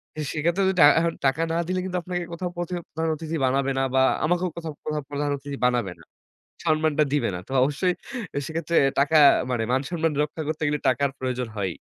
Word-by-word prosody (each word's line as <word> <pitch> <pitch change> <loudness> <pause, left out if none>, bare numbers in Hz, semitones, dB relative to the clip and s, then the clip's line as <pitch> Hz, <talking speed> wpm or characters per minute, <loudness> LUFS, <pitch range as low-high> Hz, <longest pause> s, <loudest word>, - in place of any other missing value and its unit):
তো 155 - -4
সেক্ষেত্রে 170 +5 +1 0.2
টা - - +10
এখন 170 0 0
টাকা 135 +4 +2
না - - 0
দিলে 185 0 -1
কিন্তু 180 -1 -2
আপনাকে 175 0 -3
কোথাও 180 +1 -3
অথ 175 - -10 0.2
প্রধান 160 +1 -1
অতিথি 160 +1 -5
বানাবে 135 +1 +1
না - - +2
বা 130 - +5 0.2
আমাকেও 175 +2 +1
কোথাও 160 -2 -5 0.4
প্রধান 145 0 -1
অতিথি 140 0 -7
বানাবে 120 -7 +1
না। - - -16 0.6
সম্মানটা 155 -1 +2
দিবে 145 - +1
না। - - -3
তো - - -8
অবশ্যই 150 +7 +1 0.5
সেক্ষেত্রে 165 +1 -2 0.2
টাকা 145 +3 +3 0.3
মানে 120 -2 0
মান-সম্মান 155 +4 0
রক্ষা 155 +2 -4
করতে 155 0 -3
গেলে 150 0 0
টাকার 135 +2 +2
প্রয়োজন 125 -2 -3
হয়। 95 -3 -1
155 Hz, 190 wpm, -24 LUFS, 135-165 Hz, 0.6 s, টা